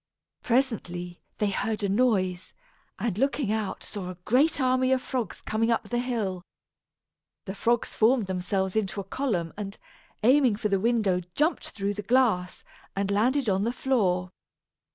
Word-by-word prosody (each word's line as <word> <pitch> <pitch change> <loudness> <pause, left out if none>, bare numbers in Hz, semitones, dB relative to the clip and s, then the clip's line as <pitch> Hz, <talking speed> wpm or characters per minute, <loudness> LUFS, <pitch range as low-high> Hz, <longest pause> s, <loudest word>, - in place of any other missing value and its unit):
Presently, 180 -9 -1 0.2
they 210 -1 +1
heard 215 +2 -2
a - - +2
noise, 195 -5 +1 0.4
and 215 -4 -2
looking 275 -4 +1
out 215 -2 -2
saw 190 -3 -6
a 185 - -6
great 285 +7 +3
army 255 0 +2
of 260 - +4
frogs 255 -2 -4
coming 225 +1 0
up 230 - 0
the 240 - 0
hill, 220 -7 -2 1.0
The 190 - -4
frogs 235 +3 0
formed 230 0 +3
themselves 190 +1 -1
into 205 -2 -1
a - - -3
column 190 -6 -2
and, 200 -1 -5 0.5
aiming 255 -1 +5
for 210 0 -2
the 195 -1 +2
window, 215 -4 +2
jumped 310 +4 +1
through 200 -1 -2
the 210 - -5
glass, 210 -5 +1 0.3
and 195 0 -1
landed 245 +6 +2
on 195 -1 +2
the 230 - +1
floor. 190 -9 0
215 Hz, 155 wpm, -27 LUFS, 190-250 Hz, 1.0 s, aiming